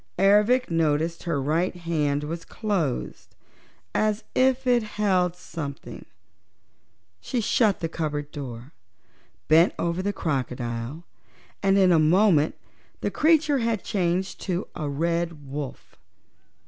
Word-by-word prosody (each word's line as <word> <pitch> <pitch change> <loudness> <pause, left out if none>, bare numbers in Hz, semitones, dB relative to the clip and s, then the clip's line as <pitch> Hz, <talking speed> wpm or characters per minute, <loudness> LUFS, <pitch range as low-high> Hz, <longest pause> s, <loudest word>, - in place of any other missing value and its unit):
Ervic 210 +5 +4
noticed 165 +1 0
her 170 -5 0
right 160 +7 0
hand 150 -4 -1
was 165 +3 -5
closed, 190 - -3 0.6
as 215 0 +1
if 260 0 +3
she 250 -2 +4
held 195 -5 0
something 150 -6 -7
in - - -10
it. - - -17 1.1
She 245 - -3
shut 215 -2 +2
the 165 - 0
cupboard 150 -3 -3
door, 125 -2 -8 0.7
bent 165 +3 +5
over 170 +2 -1
the 200 +2 -1
crocodile 130 -3 -3 0.6
and 195 0 +3
in 190 -2 +5
a 165 - +5
moment 165 -1 +4 0.5
the - - -1
creature 310 -3 +3
had 230 -3 -1
changed 185 -2 -1
to 185 -1 -2
a 150 -3 -4
red 165 0 -2
wolf. 140 -1 -7
170 Hz, 125 wpm, -25 LUFS, 150-205 Hz, 1.1 s, bent